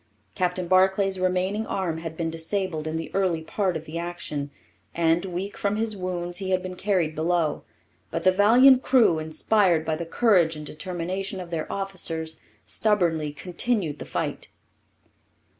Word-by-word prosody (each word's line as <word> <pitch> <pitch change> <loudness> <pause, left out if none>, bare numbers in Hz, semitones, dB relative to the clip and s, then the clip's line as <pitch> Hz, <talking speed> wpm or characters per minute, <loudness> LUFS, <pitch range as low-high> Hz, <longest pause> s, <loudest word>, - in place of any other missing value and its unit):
Captain 180 0 -1
Barclay's 190 +1 +3
remaining 185 +4 0
arm 170 -4 -2
had 165 -1 -7
been 165 -1 -1
disabled 165 -1 -3
in 160 +1 -2
the 165 - -5
early 180 -5 +1
part 185 0 -1
of 160 - -10
the 160 +2 -5
action, 170 -4 -4 0.5
and, 170 +2 +2
weak 190 +2 -4
from 200 0 -1
his 220 0 -1
wounds, 175 -2 -3
he 190 -1 -3
had 185 -1 +1
been 185 0 -5
carried 180 -5 0
below. 160 0 0 0.5
But - - -3
the 185 - +6
valiant 245 +7 +6
crew, 235 -13 +4
inspired 165 +2 +2
by 160 0 0
the 170 +1 -5
courage 175 -5 +3
and 150 0 -7
determination 185 +5 -4
of 175 -2 -8
their 160 -2 -3
officers, 165 -5 -3 0.3
stubbornly 170 -8 +1
continued 175 - -2
the - - -6
fight. - - -3
180 Hz, 160 wpm, -25 LUFS, 160-195 Hz, 0.5 s, the